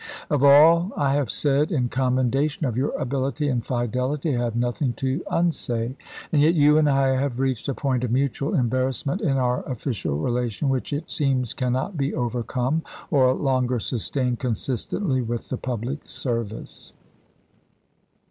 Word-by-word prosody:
Of 145 -2 +2
all 165 +6 +6
I 140 -1 +2
have 145 -2 0
said 145 +2 +2
in 130 -7 +1
commendation 130 +4 0
of 120 -4 -1
your 130 +4 0
ability 140 +3 -1
and 120 -3 -1
fidelity 125 +5 -1
I - - -1
have 115 -1 -2
nothing 120 +2 0
to 130 +6 -2
unsay, 125 -8 0 0.4
and 145 - +4
yet 160 +4 +4
you 150 0 +5
and 150 -1 +3
I 135 -1 +3
have 130 -2 -2
reached 130 -2 -1
a 135 - -1
point 130 -4 -1
of 125 - -1
mutual 140 - 0
embarrassment 130 - 0
in 140 -9 +1
our 125 -1 +1
official 115 - -3
relation 120 - -1
which 130 -2 -1
it 145 +3 -4
seems 130 -5 0
can 125 -2 -1
not 135 +8 -2
be 140 0 -1
overcome 125 +5 -1 0.3
or 130 -3 +4
longer 130 -3 0
sustained 125 +2 0
consistently 130 - -1
with 120 0 -4
the 130 - -2
public 125 +4 -4
service." 115 -4 -5
130 Hz, 155 wpm, -24 LUFS, 125-145 Hz, 0.4 s, all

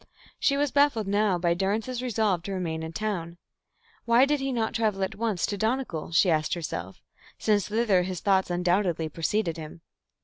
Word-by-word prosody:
She 280 - +2
was 290 -1 +1
baffled 280 -7 +3
now 205 -2 +2
by 170 -1 +1
Durrance's 215 +7 -1
resolve 220 -7 0
to 195 +3 -5
remain 165 -4 -3
in 160 0 -5
town. 175 -3 -3 0.7
Why 235 +3 +5
did 295 +1 +1
he 270 0 -2
not 230 -3 -1
travel 215 -4 0
at 190 - -2
once 215 -5 -1
to 205 - -4
Donegal, 220 -9 -2
she 175 +2 +4
asked 155 0 +1
herself, 95 - -6 0.3
since 205 -3 +1
thither 210 -4 +2
his 180 -1 -3
thoughts 190 -2 +2
undoubtedly 175 -2 +1
preceded 170 +2 -1
him. 160 +1 -9
195 Hz, 175 wpm, -27 LUFS, 170-225 Hz, 0.7 s, Why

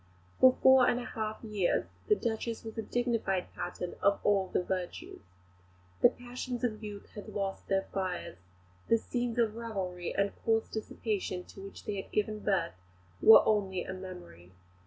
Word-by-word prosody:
For 255 0 +7
four 260 -1 +8
and 245 - +1
a 245 - -5
half 215 -1 -4
years 210 -5 +1 0.2
the 420 - +5
Duchess 230 - -3
was 225 -1 -7
a 225 - -2
dignified 225 -6 -1
pattern 175 0 -4
of 200 0 +3
all 200 -2 +3
the 180 - 0
virtues. 180 -1 -4 0.8
The - - +8
passions 245 0 -6
of 220 -3 -1
youth 205 -1 -8
had 205 - -9
lost 195 -1 -3
their 195 0 +2
fires; 185 - -3 0.5
the 230 - +5
scenes 240 +1 -3
of 225 -3 +2
revelry 190 -6 -4
and 200 0 +1
coarse 225 -1 +2
dissipation 210 -4 -3
to 195 - -12
which 195 0 -10
they 200 -2 -2
had - - -18
given 215 0 0
birth 195 -5 0 0.5
were 220 - +9
only 195 -4 +1
a 190 - -5
memory. 180 - -10
210 Hz, 165 wpm, -31 LUFS, 190-230 Hz, 0.8 s, were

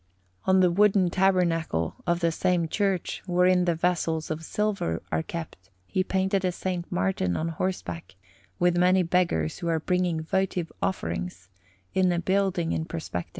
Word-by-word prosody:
On 190 0 +4
the 180 -1 +4
wooden 195 -1 +4
tabernacle 170 - +1
of 175 0 +1
the 170 -1 +2
same 175 0 +1
church, 195 +1 -1
wherein 180 0 +3
the 170 -2 +2
vessels 165 -2 0
of 155 +1 -4
silver 195 - -1
are 80 - +1
kept, 155 - -7 0.2
he 185 - 0
painted 190 +1 0
a - - +2
S. 180 - -5 0.3
Martin 90 -1 0
on 165 - -1
horseback, 170 - -4 0.4
with 175 0 +3
many 185 +1 +4
beggars 170 - 0
who 170 - -4
are 165 -1 +1
bringing 180 -1 0
votive 180 -1 -1
offerings, 90 +1 -3 0.4
in 185 -1 +3
a 175 - 0
building 185 -1 +1
in 160 - -1
perspective. 160 - -5
175 Hz, 155 wpm, -26 LUFS, 160-185 Hz, 0.4 s, On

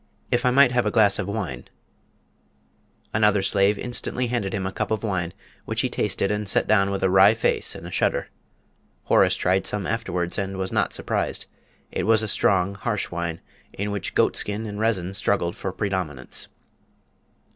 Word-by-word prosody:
If 120 +1 +2
I - - +6
might 130 0 +5
have 125 -1 +1
a - - +3
glass 105 -3 +3
of 95 - -2
wine 95 - -4 0.8
" - - -40
Another 105 -2 +3
slave 100 +1 +2
instantly 125 +1 0
handed 115 -5 -2
him 95 -1 -3
a 95 - -2
cup 105 +1 -3
of 110 0 -2
wine, 90 -5 -2 0.3
which - - -1
he - - -1
tasted 100 - 0
and 105 -1 -1
set - - +3
down 100 -2 +3
with 100 -1 -3
a 95 - +3
wry 95 +3 +6
face 110 - +1
and - - -9
a - - -8
shudder. - - 0 0.7
Horace 95 -1 +3
tried 95 +1 +1
some 105 -2 -1
afterwards, 90 -6 -2
and 95 -1 -3
was 95 0 -2
not - - +1
surprised. - - -2 0.5
It - - -2
was 110 -1 +4
a - - -2
strong, 95 -1 +2
harsh 105 +1 -3
wine, 85 -1 -4 0.3
in 100 +1 -3
which 100 -3 -4
goatskin 105 +2 +1
and 105 -1 -6
resin 95 -5 0
struggled 90 -3 0
for 95 - -4
predominance. 90 -10 -3
100 Hz, 180 wpm, -24 LUFS, 95-110 Hz, 0.8 s, I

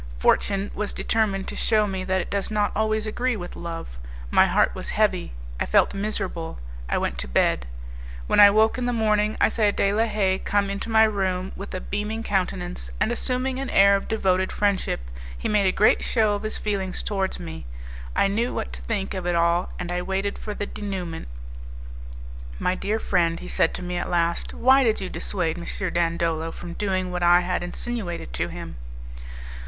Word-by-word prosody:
Fortune 195 - +2
was 210 0 -3
determined 200 -4 0
to - - -6
shew 215 -2 +3
me 190 -1 -3
that 185 0 +1
it - - -8
does 200 -1 -1
not 210 -1 +1
always 215 0 +1
agree 245 +3 -1
with 175 -4 -7
love. 165 - -7 0.3
My - - +6
heart - - +3
was - - -6
heavy, - - +1 0.3
I - - -1
felt - - +4
miserable; 195 -5 -2 0.3
I - - +1
went 60 - -2
to 65 - -3
bed. 65 -1 +1 0.6
When - - +2
I 205 0 +11
woke 220 +4 +3
in 250 - -1
the 245 - 0
morning, 215 -1 +1
I - - +5
saw 215 -1 +2
De 200 0 +1
la 220 +2 +3
Haye 195 -4 +1
come 200 -1 0
into 200 +3 -4
my 220 0 +6
room 190 -3 0
with 195 -1 -7
a - - -2
beaming 210 +4 -3
countenance, 180 -3 -2
and, 220 - +1
assuming 255 +1 0
an 270 -1 -3
air 200 0 +6
of 195 - -3
devoted 190 -4 +1
friendship, 200 - 0 0.4
he - - -3
made 205 -2 +3
a - - +4
great 210 - +4
show 220 -3 +2
of 205 - -2
his 215 0 -2
feelings 195 -3 -2
towards 195 -2 -2
me. 80 -5 -8 0.5
I - - +4
knew 225 +5 -1
what - - -4
to - - -7
think 190 - -2
of 185 -2 -4
it 175 - +1
all, 170 +1 +2
and 175 0 -4
I 180 0 -1
waited 195 +2 -2
for 210 - -5
the 205 - -3
'denouement'. 190 -6 -5 1.3
"My 180 - +1
dear 205 +3 -1
friend," 170 -5 +1
he - - -8
said 165 - +2
to - - -5
me 180 0 -3
at 175 - -3
last, 170 -1 0
"why 265 +2 +5
did 220 -3 +2
you 190 -2 -4
dissuade 175 -3 -2
M. 180 +1 -3
Dandolo 165 -1 0
from 175 0 -8
doing 185 -1 -1
what 180 0 -3
I 175 +1 +6
had 180 0 -1
insinuated 175 - -4
to - - -1
him?" - - -8
195 Hz, 200 wpm, -24 LUFS, 175-215 Hz, 1.3 s, I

